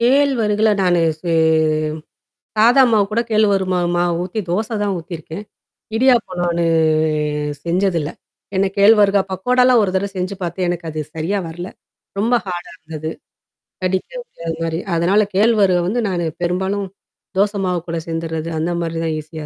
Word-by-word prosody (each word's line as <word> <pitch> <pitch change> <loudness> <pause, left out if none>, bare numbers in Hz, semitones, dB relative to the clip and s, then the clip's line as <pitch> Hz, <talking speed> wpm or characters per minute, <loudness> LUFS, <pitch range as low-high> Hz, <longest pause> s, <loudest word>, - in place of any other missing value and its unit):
கேழ்வரகுல 235 -5 +3
நானு 175 -2 +3 0.2
செ 170 -1 -2 1.3
சாதா 245 +5 +6
மாவுகூட 215 +1 +2
கேழ்வரகு 205 -3 +3
மா 180 - +2 0.2
மா 175 - +2
மாவு 175 - 0
ஊத்தி 185 +4 -4
தோச 210 +5 0 0.2
தான் 200 -1 0
ஊத்தியிருக்கேன். 165 +2 -7 0.5
இடியாப்பம் 230 -7 +2
நானு 170 -1 0 1.0
செஞ்சதில்ல. 170 -3 0 0.4
ஏன்னா 195 +1 +2
கேழ்வரகு 200 -1 +5
பக்கோடா 250 +7 +2
லாம் 250 -3 +5
ஒரு 190 - 0
தடவ 200 +2 0
செஞ்சு 185 +2 -2
பார்த்து 175 +1 -2
எனக்கு 175 -1 -3
அது 155 0 -4
சரியா 165 +6 -1
வரல. 175 +2 -6 0.5
ரொம்ப 225 +4 +1
ஹார்டா 175 -1 -5
இருந்தது. 155 0 -6 0.7
கடிக்க 185 0 -1
முடியாதமாரி. 165 - -4 0.2
அதனால 180 +5 +3
கேழ்வரக 200 -3 +4
வந்து 225 +6 0
நானு 175 -2 -1 0.2
பெரும்பாலும் 190 +3 -1 0.5
தோச 205 +1 +3
மாவு 180 -1 0
கூட 165 - -2
சேர்ந்துர்றது. 165 0 -3
அந்தமாரி 165 0 -2
தான் 160 -1 -1
ஈஸியா 155 0 -8
185 Hz, 140 wpm, -19 LUFS, 170-210 Hz, 1.3 s, சாதா